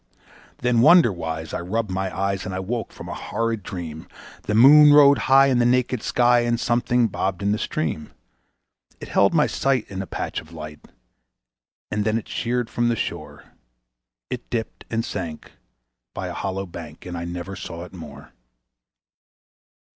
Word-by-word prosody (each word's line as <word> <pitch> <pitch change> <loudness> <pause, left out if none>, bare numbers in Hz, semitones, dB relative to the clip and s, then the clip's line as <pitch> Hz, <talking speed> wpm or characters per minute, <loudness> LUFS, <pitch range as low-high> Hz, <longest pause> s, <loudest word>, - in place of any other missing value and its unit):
Then, 120 -1 +2
wonder 165 - +6
wise, 80 -2 -5
I - - -2
rubbed 105 +3 -2
my 95 0 -2
eyes 100 0 -1
and 95 - -5
I - - -2
woke 110 +3 -4
from - - -10
a - - -5
horrid 115 -1 -3
dream. 85 -5 -7 0.3
The 105 - -2
moon 145 +5 +8
rode 140 -3 +7
high 135 +1 +7
in 130 -3 +2
the - - +4
naked 125 -1 +1
sky, 120 0 +3
and 120 0 0
something 120 0 +1
bobbed 95 -2 -3
in 100 - +1
the 105 - 0
stream. 75 -1 -3 0.9
It - - -9
held - - +3
my - - +3
sight 135 -4 0
in 95 -1 -4
a 95 - -7
patch - - -4
of 80 - -18
light, 75 -1 -8 1.1
and 105 0 0
then 110 +1 +1
it 115 - -6
sheered 120 0 -2
from 120 +1 0
the 120 - +1
shore; - - -5 0.9
It - - -6
dipped 115 -2 -4
and 115 0 -1
sank 85 -5 -6 0.6
by - - -4
a - - -5
hollow 95 0 -3
bank, 85 -4 -10
and 90 -1 -6
I 85 0 -4
never 90 +2 -6
saw 85 -1 -7
it 90 - -12
more. 75 -4 -11
105 Hz, 175 wpm, -23 LUFS, 85-120 Hz, 1.1 s, moon